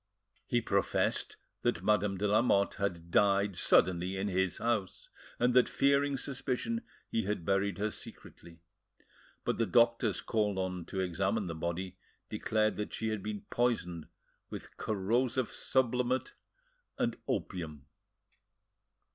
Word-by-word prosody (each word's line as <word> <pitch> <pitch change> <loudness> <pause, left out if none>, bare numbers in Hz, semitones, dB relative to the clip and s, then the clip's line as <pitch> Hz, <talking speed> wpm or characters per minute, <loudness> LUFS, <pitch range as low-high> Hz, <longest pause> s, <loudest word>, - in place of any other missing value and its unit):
He - - +2
professed - - 0 0.2
that 85 - 0
Madame 105 -1 +2
de 105 +3 0
Lamotte 105 -1 +3
had 85 -4 -2
died 100 0 +3
suddenly 90 +1 +3
in 100 +2 -1
his 95 -1 0
house, 115 -6 -2 0.3
and 125 +1 +2
that, 125 0 +5
fearing 140 0 +2
suspicion, 135 - -2 0.3
he 115 - 0
had 100 -4 -2
buried 100 0 +1
her 105 +2 -1
secretly. 85 -1 -11 0.8
But - - -1
the 115 - +2
doctors 115 -4 +3
called 105 -3 0
on 90 -2 -2
to 95 - -3
examine 95 +4 0
the 85 - -4
body 85 +3 -4 0.3
declared 110 0 0
that 105 - -4
she 110 - -2
had 110 -2 -2
been 105 0 -5
poisoned 90 -9 0 0.4
with - - -8
corrosive 115 +5 0
sublimate 125 0 0 0.6
and - - 0
opium. 80 -6 -3
100 Hz, 130 wpm, -32 LUFS, 95-115 Hz, 0.8 s, that